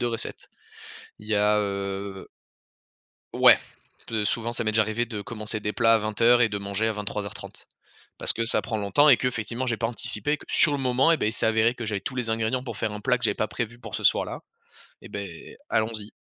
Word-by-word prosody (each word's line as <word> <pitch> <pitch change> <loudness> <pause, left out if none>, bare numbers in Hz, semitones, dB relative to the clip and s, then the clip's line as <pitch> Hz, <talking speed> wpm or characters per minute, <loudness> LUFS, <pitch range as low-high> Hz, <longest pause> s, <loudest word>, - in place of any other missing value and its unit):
de 120 - 0
recettes. 115 -1 -2 0.7
Il 105 - -13
y 110 - +1
a, 105 +1 +3
heu 100 -1 -4 1.1
Ouais. - - +7 0.5
Peut 110 -2 -1
souvent 115 +3 -1
ça 120 - -2
m'est 110 - +1
déjà 110 - +4
arrivé 110 +2 -1
de 110 -3 -6
commencer 110 -2 -5
des 105 0 -2
plats 115 -1 +4
à 115 - +5
20:00 115 +3 +3
et 115 - +4
de 100 -1 -3
manger 100 +2 -1
à - - 0
23:30. 105 -1 -6 0.5
Parce - - +2
que 115 - -1
ça - - +2
prend 110 - -3
longtemps 105 +9 +3
et 130 - +9
que - - -2
effectivement 120 +1 -4
j'ai 120 -2 0
pas 115 - 0
anticipé 120 +4 +1
que, - - -15
sur 150 - +4
le 145 - -1
moment 130 +4 +3
et, - - +3
beh, 115 - 0
il - - -2
s'est 110 - 0
avéré 110 +2 +3
que 120 -3 -6
j'avais 105 -2 -2
tous 130 - -6
les 125 -2 -1
ingrédients 115 +3 0
pour 120 -4 -6
faire 110 -1 -2
un 105 - -6
plat 125 +2 +2
que 125 - -5
j'avais - - +2
pas 110 - -2
prévu 120 -1 -5
pour - - -10
ce - - -4
soir-là. - - +2 0.6
Et, - - -12
beh, 100 -5 -8
allons-y! 110 -1 -1
110 Hz, 235 wpm, -25 LUFS, 105-120 Hz, 1.1 s, et